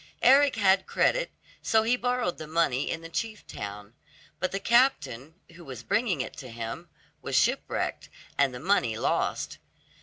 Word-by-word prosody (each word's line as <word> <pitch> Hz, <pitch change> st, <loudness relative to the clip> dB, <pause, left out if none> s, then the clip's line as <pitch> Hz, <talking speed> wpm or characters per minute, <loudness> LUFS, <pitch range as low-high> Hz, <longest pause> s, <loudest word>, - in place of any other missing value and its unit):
Eric 275 Hz, +1 st, +6 dB
had 195 Hz, -3 st, +3 dB
credit, -, -, +1 dB, 0.3 s
so 220 Hz, -1 st, +3 dB
he 235 Hz, +3 st, +3 dB
borrowed 245 Hz, -6 st, -1 dB
the 155 Hz, -, -7 dB
money 150 Hz, -4 st, +1 dB
in 165 Hz, -, -3 dB
the 165 Hz, -, -8 dB
chief 215 Hz, +5 st, -4 dB
town. 100 Hz, +1 st, -8 dB, 0.5 s
But 185 Hz, -, -1 dB
the 195 Hz, -, -2 dB
captain, 165 Hz, -, +2 dB, 0.2 s
who 170 Hz, +1 st, -13 dB
was 135 Hz, -5 st, -8 dB
bringing 205 Hz, -, +1 dB
it -, -, -6 dB
to 130 Hz, -4 st, -8 dB
him, 115 Hz, 0 st, -6 dB, 0.3 s
was -, -, -3 dB
shipwrecked, -, -, 0 dB, 0.3 s
and 140 Hz, -2 st, +3 dB
the 125 Hz, -, -7 dB
money 130 Hz, -, +1 dB
lost. -, -, -1 dB
170 Hz, 160 wpm, -28 LUFS, -, 0.5 s, Eric